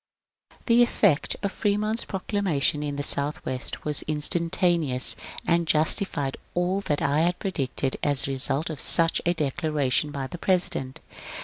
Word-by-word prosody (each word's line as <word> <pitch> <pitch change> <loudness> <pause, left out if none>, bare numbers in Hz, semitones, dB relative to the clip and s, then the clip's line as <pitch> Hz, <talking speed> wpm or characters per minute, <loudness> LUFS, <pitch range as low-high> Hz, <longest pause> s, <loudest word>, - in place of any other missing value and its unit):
The 235 0 +4
effect 205 -9 +2
of 200 - -1
Fremont's 215 +2 -1
proclamation 190 -7 -1
in 145 -1 -3
the 145 - -3
Southwest 140 -3 -1
was 150 -1 +2
instantaneous, 160 -2 +1 0.3
and 170 -1 +1
justified 155 -3 +1 0.2
all 180 +3 0
that 150 -7 -2
I 145 +2 +1
had 175 +2 +1
predicted 135 -7 -2
as 145 -2 +2
the 140 - 0
result 135 +4 -1
of 150 - -4
such 165 0 +3
a 175 - +2
declaration 150 -2 -1
by 140 -2 -5
the 150 +6 -8
President. 170 -9 -1
155 Hz, 140 wpm, -25 LUFS, 140-180 Hz, 0.3 s, The